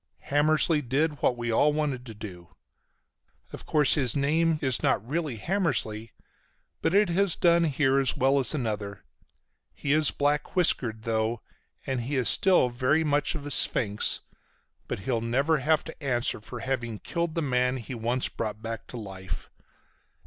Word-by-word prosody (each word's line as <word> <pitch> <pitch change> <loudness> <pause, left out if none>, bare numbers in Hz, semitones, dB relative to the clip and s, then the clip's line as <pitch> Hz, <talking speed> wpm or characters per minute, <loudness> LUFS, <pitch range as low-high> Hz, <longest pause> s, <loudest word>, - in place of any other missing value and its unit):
Hammersly 155 +2 +3
did 145 +4 -1
what 120 - +2
we 120 0 -2
all 145 +6 +3
wanted 140 -5 -2
to 110 - -9
do. 90 -5 -9 1.1
Of - - -9
course 150 -3 +3
his 130 -5 +1
name 155 +3 +2
is 130 -4 +2
not 110 - 0
really 150 -4 -2
Hammersly, 115 - -1 0.7
but 165 - +1
it 205 -2 +4
has 190 +1 +2
done 170 -1 +3
here 135 -2 +2
as 135 -3 0
well 135 +2 +3
as 135 +3 +1
another. 105 -6 -4 0.7
He 145 - -1
is 155 -1 +4
black 145 +4 -1
whiskered 120 -11 +1
though, 110 0 -1 0.4
and 130 -2 -2
he 135 +5 -3
is 130 -3 +1
still 185 -9 +4
very 130 +6 +1
much 145 +1 +1
of 145 -2 -6
a 145 - -6
sphinx, 105 -7 +2 0.7
but - - -4
he'll 115 +2 -1
never 135 +7 +1
have 155 +3 +2
to 160 -1 -11
answer 120 -5 0
for 120 +2 -8
having 120 -4 -3
killed 170 - -3
the 165 - 0
man 125 -1 +1
he 125 +1 -7
once 120 +2 -1
brought 110 -2 -5
back 115 0 -6
to 125 - -8
life. 95 -4 -7
130 Hz, 165 wpm, -27 LUFS, 115-155 Hz, 1.1 s, it